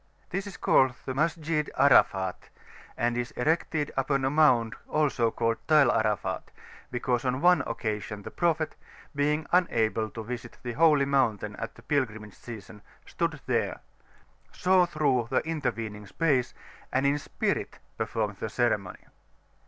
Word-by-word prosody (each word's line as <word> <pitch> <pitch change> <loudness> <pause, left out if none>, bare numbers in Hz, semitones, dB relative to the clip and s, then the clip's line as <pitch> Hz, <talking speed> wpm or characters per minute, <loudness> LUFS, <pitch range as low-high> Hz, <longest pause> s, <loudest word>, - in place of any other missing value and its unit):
This 195 +2 -3
is 195 - -8
called 130 -2 +3
the 130 - -3
Masjid 155 +1 0
Arafat, 95 -9 +3 0.5
and 120 +1 +1
is 120 0 -2
erected 155 +2 0
upon 135 0 0
a 135 - +1
mound 125 -7 +4
also 145 -6 +1
named 115 -1 +1
Tall 155 -3 +6
Arafat, 105 -3 -1 0.4
because 125 -1 -1
on 130 0 0
one 175 0 +5
occasion 105 -2 -4
the - - -8
Prophet, 165 -2 0 0.4
being 150 +2 +1
unable 115 -11 +2
to 110 - -7
visit 120 +1 -7
the 120 - -3
Holy 150 -1 +4
Mountain 110 -7 +1
at 115 - -6
the - - -16
pilgrimage 110 -8 -2
season, 105 -3 -10 0.2
stood 165 -4 -2
there, 120 -3 -1 0.7
saw 180 -1 +3
through 140 -7 +1
the 135 +4 0
intervening 115 -9 -3
space, 140 -2 0 0.4
and 135 +1 +1
in 140 +1 +2
spirit - - -2 0.2
performed 105 -3 -2
the 110 - -4
ceremony. 105 -6 -1
130 Hz, 140 wpm, -28 LUFS, 115-150 Hz, 0.7 s, Tall